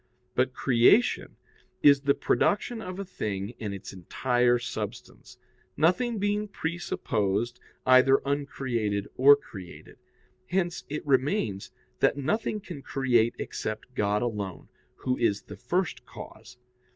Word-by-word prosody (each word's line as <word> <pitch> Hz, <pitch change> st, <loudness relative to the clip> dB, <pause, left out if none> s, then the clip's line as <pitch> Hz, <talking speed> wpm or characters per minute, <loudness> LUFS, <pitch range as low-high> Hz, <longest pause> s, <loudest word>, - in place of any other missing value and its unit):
But 130 Hz, +1 st, +1 dB
creation 130 Hz, -, +3 dB, 0.5 s
is 140 Hz, -1 st, +7 dB
the 140 Hz, 0 st, +2 dB
production 225 Hz, +3 st, +1 dB
of 185 Hz, -3 st, -6 dB
a 200 Hz, -, -4 dB
thing 105 Hz, -, -4 dB
in 105 Hz, -3 st, -4 dB
its 100 Hz, 0 st, -8 dB
entire 120 Hz, +6 st, +1 dB
substance, 120 Hz, -, -7 dB, 0.4 s
nothing 220 Hz, -, +2 dB
being 205 Hz, +1 st, 0 dB
presupposed 120 Hz, -, -2 dB, 0.3 s
either 130 Hz, +1 st, +6 dB
uncreated 125 Hz, -8 st, -1 dB
or 140 Hz, +3 st, +8 dB
created. 95 Hz, -10 st, -12 dB, 0.5 s
Hence 175 Hz, -1 st, -1 dB
it 150 Hz, +1 st, -4 dB
remains 130 Hz, -, 0 dB, 0.3 s
that -, -, +3 dB
nothing 210 Hz, +8 st, -1 dB
can 170 Hz, -7 st, -8 dB
create 120 Hz, -5 st, +1 dB
except 110 Hz, +4 st, -5 dB
God 105 Hz, -2 st, +1 dB
alone, 105 Hz, -6 st, -4 dB, 0.3 s
Who 125 Hz, -1 st, -2 dB
is 105 Hz, -3 st, +1 dB
the 105 Hz, -, -10 dB
first 175 Hz, -, -2 dB
cause. -, -, -12 dB
130 Hz, 120 wpm, -27 LUFS, 110-170 Hz, 0.5 s, or